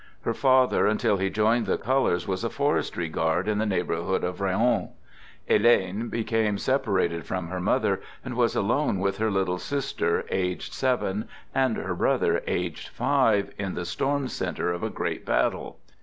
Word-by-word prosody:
Her - - 0
father, 130 -1 +3
until 105 0 +2
he 95 0 0
joined 110 +4 +2
the - - +1
colors, 130 -9 +1
was 95 +2 -2
a 115 - 0
forestry 140 - 0
guard 80 +3 0
in 105 -1 +1
the 110 - 0
neighborhood 90 -1 -1
of 90 +2 -3
Raon. 100 +6 +1 0.6
Helene 105 -1 +3
became 110 -2 0
separated 100 - 0
from 90 -3 -3
her 90 +1 -3
mother, 90 - +1 0.2
and - - -4
was - - +1
alone - - +1
with 100 +1 0
her 110 0 +1
little 95 -2 0
sis 140 +3 -3
ter, 85 - 0
aged 90 -1 -2
seven, 120 -6 0 0.3
and 130 -3 +1
her - - -3
brother, - - +1
aged - - -2
five, 105 -3 +2
in 95 -2 -3
the 90 - -3
storm 135 +9 -1
center 90 - -2
of 85 - -5
a - - -1
great - - -3
battle. - - 0
100 Hz, 170 wpm, -26 LUFS, 90-120 Hz, 0.6 s, father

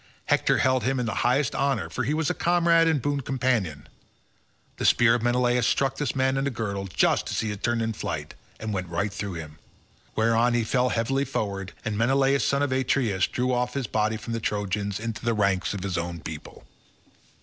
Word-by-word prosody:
Hector - - +2
held 130 -1 +2
him 135 0 0
in 125 - -1
the 110 - -2
highest 130 +4 +2
honour 140 0 0
for 130 - -3
he 145 +6 0
was 160 -1 0
his - - -2
comrade 170 -1 +4
and 160 -3 +2
boon 145 -1 0
companion; 120 - -1 0.9
the - - -4
spear 120 -1 +5
of 120 - +1
Menelaus 120 0 +2
struck 135 -1 +1
this 145 -4 -2
man 130 0 +1
in 135 - 0
the - - +1
girdle 100 -6 -3
just 90 - +1
as - - -1
he 110 - -2
had 105 - -7
turned 120 -1 0
in 110 0 -1
flight, 80 -8 -5 0.3
and 110 -1 -4
went 90 -2 -3
right 100 +4 -1
through 100 -2 -4
him. 80 -1 -8 0.6
Whereon 115 +2 +3
he 120 - +2
fell 125 +3 +1
heavily 135 +5 0
forward, 100 -7 -3
and 110 -1 -2
Menelaus 135 +3 +3
son 140 0 +1
of 145 - -1
Atreus 125 -7 +1
drew 125 +1 -1
off 125 +1 -1
his 135 -2 -1
body 110 0 0
from 115 +2 -6
the 115 - -1
Trojans 100 -1 -2
into 115 0 -5
the 120 -1 +1
ranks 100 -3 +1
of 95 - -5
his 95 -3 -1
own 85 0 -4
people. 80 -2 -9
115 Hz, 210 wpm, -26 LUFS, 100-130 Hz, 0.9 s, spear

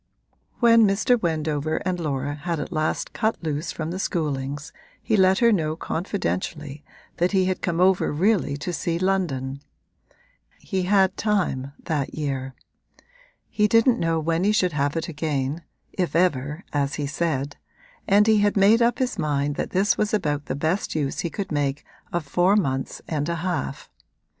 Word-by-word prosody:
When 230 -2 +6
Mr. 220 +5 +2
Wendover 155 -2 -1
and 185 -1 -1
Laura 145 -3 -2
had 165 +2 -3
at 145 - -5
last 155 -2 -1
cut 220 +1 0
loose 155 +1 -2
from 160 0 -4
the 185 - -4
Schoolings 145 -4 -2 0.3
he 220 - 0
let 190 -1 +4
her 235 0 +4
know 160 -6 +1
confidentially 160 -5 -3 0.3
that 175 +3 +1
he 190 -1 +3
had 185 0 -1
come 170 -1 -1
over 185 0 +3
really 175 -3 +1
to 175 +5 -4
see 165 +2 -1
London; 150 -8 -1 1.0
he 190 -3 -3
had 195 -2 +4
time, 175 -11 0
that 145 -4 -2
year; 135 -3 -3 0.9
he 210 -1 +2
didn't 230 +3 +4
know 165 -1 +1
when 165 +2 0
he 205 - +3
should 185 -5 +2
have 145 0 0
it 165 - -2
again 150 -1 -2 0.3
(if 175 -5 -2
ever, 150 -1 +1
as 140 -1 0
he 145 - -2
said) 145 -1 -2 0.5
and 205 +1 +5
he 220 -1 +4
had 205 0 +2
made 210 +4 +5
up 235 +1 +3
his 255 -1 -1
mind 145 -1 0
that - - -3
this 195 +3 +1
was 210 0 +1
about 150 -7 -2
the - - -2
best 160 +7 -1
use 145 -3 -1
he 170 - -1
could 195 +3 -5
make 145 -1 -1 0.3
of 170 -3 -2
four 175 +7 +3
months 135 -10 -1
and 150 0 -2
a 170 - 0
half. 170 -5 -3
165 Hz, 170 wpm, -24 LUFS, 145-190 Hz, 1.0 s, When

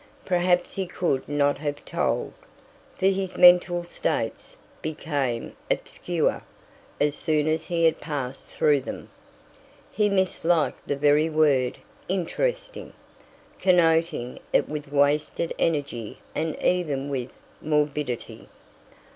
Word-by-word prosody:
Perhaps 180 -1 +2
he 190 -2 -3
could 170 -7 -1
not 145 -1 +2
have 145 -1 -4
told, - - -1 0.6
for - - -1
his 190 -1 +1
mental 175 -1 +6
states 175 - -2 0.2
became 145 -6 -2
obscure - - -1 0.6
as 145 0 +2
soon 155 0 0
as 155 +1 0
he 170 -1 +1
had 160 - +3
passed 135 -4 -5
through 145 -2 +3
them. - - -8 0.8
He 210 0 +2
misliked 175 -4 +1
the 145 - 0
very 150 +2 +3
word 145 -5 +2 0.3
"interesting," - - -2 0.7
connoting 165 -7 +2
it - - +3
with 150 -1 -6
wasted 145 +3 +1
energy 140 -9 -1 0.2
and 160 0 -2
even 150 -7 +1
with 130 -3 -3 0.3
morbidity. 145 - -2
155 Hz, 110 wpm, -25 LUFS, 145-175 Hz, 0.8 s, mental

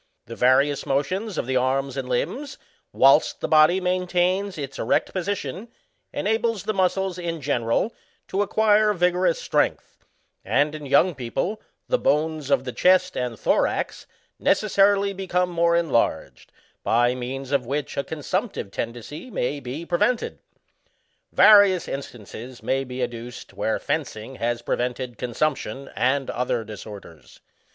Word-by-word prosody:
The 115 - -8
various 135 +3 +3
motions 185 +10 -1
of - - -1
the 130 +1 0
arms 135 +1 0
and 130 -2 -4
limbs, 265 - -2 0.3
whilst 135 +3 +4
the - - -2
body 155 +4 +5
maintains 180 +1 0
its 135 -2 -6
erect 115 - 0
position, 190 - -3 0.4
enables 220 0 0
the 215 - -1
muscles, 190 -1 0
in 170 -2 -3
general, 130 - 0 0.4
to 195 - 0
acquire 210 +1 +3
vigorous 180 -1 +2
strength; - - -1 0.4
and, 145 +9 +1
in 150 -1 -7
younc^ 145 +5 +3
people, 135 - -3 0.3
the - - +1
bones 155 -1 0
of 140 - +3
the 130 - -4
chest 185 +7 +3
and 125 -3 -3
thorax, - - 0 0.3
necessarily 200 -1 +3
become 180 -2 -1
more 170 0 +2
enlarged, 130 - 0 0.3
by 120 +2 +2
means 130 +2 -5
of 135 -4 +1
which 145 +2 -3
a 140 - -1
consumptive 170 - -3
tendency 120 - -6
may 145 - -2
be 140 +6 -6
prevented. 225 +8 0 0.9
Various 200 -4 +6
in 140 - -3
stances 120 +1 -11
may 135 +1 0
be 125 -1 -4
adduced 120 0 -7
where - - -1
fencing 110 +5 -4
has 120 0 -2
prevented 125 -1 -3
consumption 135 +2 -2
and 135 +2 +1
other 125 -2 -1
disorders. 100 - -11
145 Hz, 135 wpm, -24 LUFS, 125-185 Hz, 0.9 s, Various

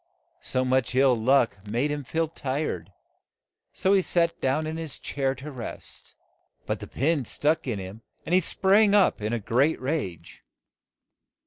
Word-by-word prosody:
So 130 0 0
much 130 -1 +1
ill 130 -1 +5
luck 115 -3 +2
made 125 +7 0
him 145 -1 -3
feel 160 +5 -1
tired, 130 - -3 0.8
so 190 - +1
he 195 - +5
sat 170 -1 0
down 135 +4 +1
in 155 +1 -4
his 160 -3 -5
chair 135 -1 -2
to 140 +4 -8
rest, 125 -4 -8 0.5
but - - -2
the - - -8
pin 145 +1 0
stuck 150 +6 0
in 115 -5 -1
him 95 +3 -8 0.2
and 175 - -2
he 185 - +5
sprang 200 +4 +3
up 195 - +3
in 105 +1 -2
a 120 - 0
great 125 +8 +1
rage. 130 - -4
135 Hz, 160 wpm, -26 LUFS, 120-160 Hz, 0.8 s, ill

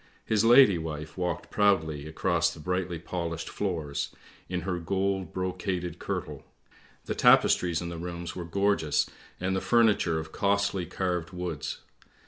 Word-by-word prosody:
" - - -36
His 110 0 +3
lady 115 -6 +7
wife 75 -1 -6
walked 90 -1 -3
proudly 80 -8 +2
across 85 +2 +1
the - - -11
brightly 90 +1 -2
polished 85 -1 -4
floors, 75 -7 -2 0.4
in 90 -1 -2
her 90 0 -2
gold 95 0 -1
brocaded 90 -1 -3
kirtle; - - -4 0.6
the - - -2
tapestries 85 -2 +4
in 85 - -4
the 85 -1 -6
rooms 85 0 -5
were 90 - -4
gorgeous, 100 -3 +1 0.3
and 95 +1 0
the 95 - 0
furniture 105 -8 +3
of 80 0 -5
costly 100 -2 0
carved 90 -2 -2
woods. 90 -5 -4
90 Hz, 145 wpm, -28 LUFS, 80-95 Hz, 0.6 s, lady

